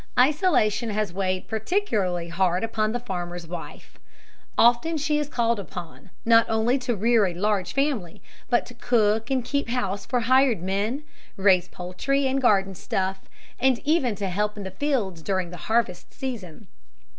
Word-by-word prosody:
Isolation 255 Hz, -, +3 dB
has 210 Hz, -3 st, -1 dB
weighed 185 Hz, -1 st, -1 dB
particularly 215 Hz, -, -1 dB
hard 180 Hz, +2 st, +1 dB
upon 215 Hz, -1 st, 0 dB
the 245 Hz, -, -2 dB
farmer's 175 Hz, -6 st, -5 dB
wife. 170 Hz, 0 st, -9 dB, 0.6 s
Often 240 Hz, +8 st, +4 dB
she 300 Hz, 0 st, +1 dB
is 295 Hz, -1 st, -3 dB
called 235 Hz, -5 st, +1 dB
upon, 180 Hz, -1 st, -9 dB, 0.2 s
not 230 Hz, 0 st, +6 dB
only 225 Hz, +4 st, +2 dB
to 245 Hz, -2 st, -1 dB
rear 220 Hz, 0 st, +3 dB
a 175 Hz, -, -4 dB
large 200 Hz, 0 st, 0 dB
family, 275 Hz, -, -1 dB, 0.3 s
but 240 Hz, -1 st, +2 dB
to 245 Hz, -, -12 dB
cook 225 Hz, -2 st, +1 dB
and 260 Hz, -3 st, 0 dB
keep 280 Hz, -3 st, -1 dB
house 205 Hz, -5 st, -2 dB
for 250 Hz, -2 st, +1 dB
hired 255 Hz, -5 st, +3 dB
men, 205 Hz, +9 st, -1 dB, 0.3 s
raise 190 Hz, -2 st, +4 dB
poultry 185 Hz, +12 st, -2 dB
and 270 Hz, +1 st, +1 dB
garden 195 Hz, -5 st, +3 dB
stuff, 190 Hz, +1 st, -2 dB, 0.4 s
and 260 Hz, -1 st, +3 dB
even 280 Hz, -7 st, +2 dB
to 200 Hz, -1 st, -3 dB
help 210 Hz, +3 st, -1 dB
in 205 Hz, -, -5 dB
the 190 Hz, -, -6 dB
fields 205 Hz, -, -1 dB
during 185 Hz, 0 st, -2 dB
the 180 Hz, -, -7 dB
harvest 220 Hz, -6 st, 0 dB
season. 235 Hz, -, -6 dB
215 Hz, 160 wpm, -25 LUFS, 190-250 Hz, 0.6 s, not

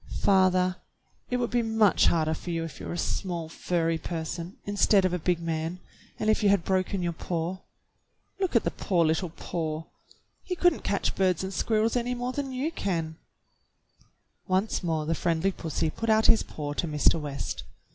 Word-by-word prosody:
*' -, -, -19 dB
Father, 185 Hz, -1 st, +4 dB, 0.5 s
it 250 Hz, -, +1 dB
would 240 Hz, -1 st, -1 dB
be 240 Hz, 0 st, +2 dB
much 220 Hz, -3 st, +4 dB
harder 160 Hz, -2 st, +2 dB
for 170 Hz, -, -7 dB
you 165 Hz, -1 st, -1 dB
if 165 Hz, -, -7 dB
you -, -, -7 dB
were -, -, -4 dB
a -, -, -4 dB
small 175 Hz, -3 st, -2 dB
furry 165 Hz, 0 st, -1 dB
person, 170 Hz, +2 st, -5 dB
instead 205 Hz, -1 st, +3 dB
of 185 Hz, -, +1 dB
a 180 Hz, -, 0 dB
big 175 Hz, +1 st, +1 dB
man, 165 Hz, +1 st, -3 dB, 0.4 s
and 215 Hz, -, -2 dB
if 215 Hz, -, +3 dB
you 205 Hz, -, +4 dB
had 200 Hz, -3 st, +3 dB
broken 190 Hz, 0 st, 0 dB
your 170 Hz, -1 st, -1 dB
paw. 170 Hz, +2 st, -3 dB, 0.8 s
Look 380 Hz, -8 st, -1 dB
at 230 Hz, -, +5 dB
the -, -, 0 dB
poor 175 Hz, -4 st, +1 dB
little 160 Hz, +3 st, +1 dB
paw. 160 Hz, -1 st, -4 dB, 0.6 s
He 360 Hz, -, -4 dB
could 355 Hz, -1 st, +4 dB
n't -, -, -9 dB
catch 200 Hz, -, 0 dB
birds 185 Hz, -2 st, +1 dB
and 190 Hz, +1 st, -4 dB
squirrels 220 Hz, +5 st, +1 dB
any 245 Hz, 0 st, 0 dB
more 245 Hz, +1 st, -2 dB
than 275 Hz, -1 st, -3 dB
you 265 Hz, +5 st, -1 dB
can." 165 Hz, -, -2 dB, 1.3 s
Once 190 Hz, +4 st, +1 dB
more 160 Hz, -4 st, -1 dB
the 165 Hz, -, +1 dB
friendly 170 Hz, +3 st, +1 dB
pussy 160 Hz, -3 st, -2 dB
put 230 Hz, +6 st, -3 dB
out 220 Hz, 0 st, +4 dB
his 225 Hz, -, +6 dB
paw 145 Hz, -1 st, -5 dB
to 170 Hz, -, -1 dB
Mr. 155 Hz, +1 st, +3 dB
West. 140 Hz, -, -4 dB
180 Hz, 195 wpm, -27 LUFS, 165-215 Hz, 1.3 s, his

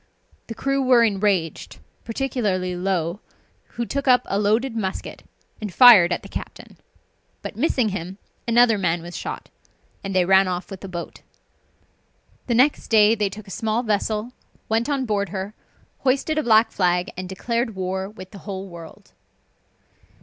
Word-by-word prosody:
The 230 Hz, -, -7 dB
crew 275 Hz, +4 st, 0 dB
were 255 Hz, -3 st, +5 dB
enraged, 195 Hz, -6 st, 0 dB, 0.3 s
particularly 215 Hz, -7 st, -2 dB
Low, 180 Hz, -1 st, -1 dB, 0.6 s
who 235 Hz, -, -2 dB
took 280 Hz, +3 st, -3 dB
up 250 Hz, -1 st, +5 dB
a 195 Hz, -, -1 dB
loaded 225 Hz, +4 st, +1 dB
musket 195 Hz, -4 st, -4 dB, 0.4 s
and 210 Hz, -2 st, -4 dB
fired 205 Hz, -5 st, +8 dB
at 175 Hz, -, -2 dB
the -, -, -9 dB
captain, -, -, -9 dB, 0.7 s
but -, -, -6 dB
missing 250 Hz, -2 st, +1 dB
him, 185 Hz, 0 st, -6 dB, 0.3 s
another 235 Hz, -2 st, +4 dB
man 175 Hz, -2 st, 0 dB
was 175 Hz, +1 st, -9 dB
shot, -, -, -6 dB, 0.5 s
and 195 Hz, -1 st, -4 dB
they 185 Hz, -1 st, +3 dB
ran 190 Hz, +1 st, +5 dB
off 180 Hz, 0 st, -4 dB
with 190 Hz, -, -8 dB
the 195 Hz, -, -7 dB
boat. 175 Hz, -2 st, -7 dB, 1.3 s
The 240 Hz, -, +1 dB
next 265 Hz, +5 st, +3 dB
day 215 Hz, -1 st, +5 dB
they 210 Hz, -3 st, 0 dB
took 205 Hz, +1 st, -10 dB
a -, -, -10 dB
small 225 Hz, +3 st, -1 dB
vessel, 215 Hz, +1 st, -1 dB, 0.4 s
went 225 Hz, +5 st, 0 dB
on 275 Hz, -2 st, 0 dB
board 200 Hz, -4 st, -1 dB
her, 190 Hz, +3 st, -5 dB, 0.5 s
hoisted 275 Hz, +4 st, +1 dB
a -, -, +2 dB
black 225 Hz, -3 st, +4 dB
flag, 180 Hz, -1 st, 0 dB
and 185 Hz, 0 st, -6 dB
declared 230 Hz, +3 st, -2 dB
war 190 Hz, +1 st, -3 dB
with 185 Hz, -3 st, -12 dB
the 200 Hz, -, -11 dB
whole 195 Hz, -1 st, -6 dB
world. 170 Hz, -3 st, -12 dB
205 Hz, 160 wpm, -22 LUFS, 185-235 Hz, 1.3 s, fired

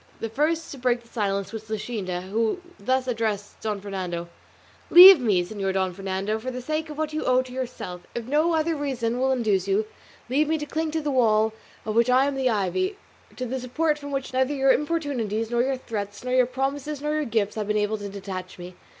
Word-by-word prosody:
The 225 Hz, -, -3 dB
first 315 Hz, +7 st, 0 dB
to 275 Hz, -, -8 dB
break 245 Hz, -1 st, 0 dB
silence 200 Hz, -3 st, -2 dB
was 220 Hz, -1 st, -7 dB
Luscinda, 205 Hz, -5 st, -3 dB
who 220 Hz, -, -1 dB, 0.2 s
thus 260 Hz, 0 st, 0 dB
addressed 220 Hz, -4 st, -2 dB
Don 210 Hz, -2 st, -2 dB
Fernando: 180 Hz, -4 st, -4 dB, 0.6 s
"Leave 365 Hz, 0 st, +11 dB
me, 200 Hz, -8 st, +2 dB
Señor 195 Hz, -1 st, -3 dB
Don 190 Hz, -1 st, 0 dB
Fernando, 195 Hz, +3 st, -2 dB
for 250 Hz, +4 st, -5 dB
the 250 Hz, 0 st, -5 dB
sake 310 Hz, +5 st, -3 dB
of 300 Hz, -, -8 dB
what 310 Hz, 0 st, -2 dB
you 310 Hz, -, -2 dB
owe 255 Hz, 0 st, +3 dB
to 255 Hz, -1 st, -11 dB
yourself; 245 Hz, -9 st, -5 dB
if 235 Hz, -1 st, -3 dB
no 305 Hz, +6 st, +2 dB
other 320 Hz, +1 st, +1 dB
reason 250 Hz, -5 st, -2 dB
will 265 Hz, +1 st, +2 dB
induce 210 Hz, -7 st, +1 dB
you, 200 Hz, +2 st, +2 dB, 0.4 s
leave 285 Hz, +5 st, +2 dB
me 320 Hz, +1 st, +1 dB
to 295 Hz, -, -4 dB
cling 315 Hz, +2 st, -2 dB
to 320 Hz, +1 st, -2 dB
the 295 Hz, -1 st, -1 dB
wall 220 Hz, -4 st, +3 dB, 0.3 s
of 215 Hz, -, -2 dB
which 235 Hz, +2 st, +3 dB
I 255 Hz, +2 st, +5 dB
am 285 Hz, -, 0 dB
the 265 Hz, -1 st, +1 dB
ivy, 240 Hz, -, 0 dB, 0.4 s
to 255 Hz, -, -4 dB
the 260 Hz, +2 st, -3 dB
support 300 Hz, +5 st, 0 dB
from 285 Hz, -1 st, -7 dB
which 275 Hz, -2 st, -3 dB
neither 260 Hz, +2 st, +1 dB
your 270 Hz, -1 st, +4 dB
importunities, 255 Hz, -9 st, -1 dB
nor 240 Hz, 0 st, +2 dB
your 265 Hz, +1 st, 0 dB
threats, 205 Hz, -4 st, -5 dB
nor 250 Hz, 0 st, -2 dB
your 255 Hz, -1 st, +4 dB
promises, 275 Hz, +3 st, -3 dB
nor 300 Hz, +1 st, -2 dB
your 305 Hz, -1 st, 0 dB
gifts 220 Hz, -4 st, 0 dB
have 215 Hz, -2 st, -3 dB
been 210 Hz, 0 st, +1 dB
able 210 Hz, +1 st, 0 dB
to 205 Hz, 0 st, -6 dB
detach 190 Hz, -2 st, -7 dB
me. 180 Hz, 0 st, -9 dB
245 Hz, 220 wpm, -25 LUFS, 205-280 Hz, 0.6 s, Leave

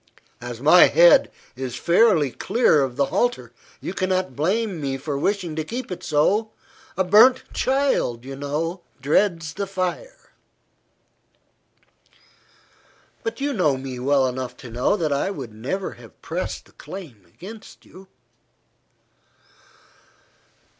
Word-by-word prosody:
As -, -, -7 dB
my -, -, +8 dB
head -, -, +6 dB, 0.2 s
is 130 Hz, -1 st, -5 dB
fairly 170 Hz, -, +3 dB
clear 200 Hz, -, +2 dB
of 130 Hz, -3 st, -2 dB
the 140 Hz, -, +2 dB
halter, 125 Hz, -, 0 dB, 0.3 s
you -, -, -5 dB
cannot 185 Hz, -6 st, -1 dB
blame 190 Hz, -, -1 dB
me 135 Hz, -1 st, -2 dB
for 140 Hz, +2 st, -4 dB
wishing 175 Hz, +2 st, -1 dB
to 155 Hz, -, -2 dB
keep 235 Hz, +6 st, -6 dB
it 180 Hz, -, -5 dB
so. 195 Hz, +9 st, +1 dB, 0.5 s
A 190 Hz, -, +3 dB
burnt 220 Hz, +8 st, +6 dB
child, 260 Hz, -, 0 dB
you 135 Hz, 0 st, -7 dB
know, 155 Hz, +6 st, -3 dB, 0.2 s
dreads 160 Hz, +2 st, +1 dB
the 200 Hz, +4 st, -4 dB
fire." 195 Hz, -, -5 dB, 2.9 s
"But 225 Hz, +3 st, -5 dB
you 285 Hz, 0 st, 0 dB
know 155 Hz, -, +2 dB
me 130 Hz, -1 st, -6 dB
well 135 Hz, +1 st, +2 dB
enough 130 Hz, 0 st, -4 dB
to 120 Hz, -, -9 dB
know 125 Hz, -, +1 dB
that 155 Hz, -5 st, 0 dB
I 140 Hz, +7 st, 0 dB
never 135 Hz, -, -5 dB
would -, -, -13 dB
have -, -, -16 dB
pressed -, -, -4 dB
the -, -, -22 dB
claim 155 Hz, -, -10 dB
against 210 Hz, -, -12 dB
you." 190 Hz, +1 st, -15 dB
170 Hz, 130 wpm, -23 LUFS, 135-205 Hz, 2.9 s, my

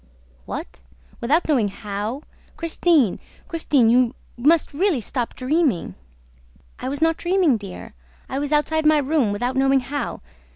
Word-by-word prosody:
"What! 60 Hz, -, -7 dB, 0.4 s
Without 290 Hz, +9 st, +1 dB
knowing 260 Hz, -9 st, +2 dB
how? 210 Hz, +6 st, -5 dB, 0.3 s
Christine, 325 Hz, -, +2 dB, 0.3 s
Christine, 295 Hz, -7 st, +2 dB
you 250 Hz, +1 st, +3 dB, 0.2 s
must 295 Hz, +7 st, +2 dB
really 345 Hz, -1 st, +1 dB
stop 240 Hz, +1 st, -3 dB
dreaming!" 260 Hz, -, 0 dB, 0.9 s
"I -, -, -3 dB
was 285 Hz, +3 st, -2 dB
not 325 Hz, 0 st, +2 dB
dreaming, 355 Hz, -6 st, +2 dB
dear, 200 Hz, -4 st, -8 dB, 0.3 s
I 270 Hz, -, -3 dB
was 290 Hz, 0 st, -3 dB
outside 310 Hz, +1 st, +2 dB
my 310 Hz, 0 st, +5 dB
room 285 Hz, -6 st, +1 dB
without 245 Hz, +5 st, -2 dB
knowing 270 Hz, 0 st, +3 dB
how. 285 Hz, +3 st, -4 dB
275 Hz, 135 wpm, -22 LUFS, 235-315 Hz, 0.9 s, my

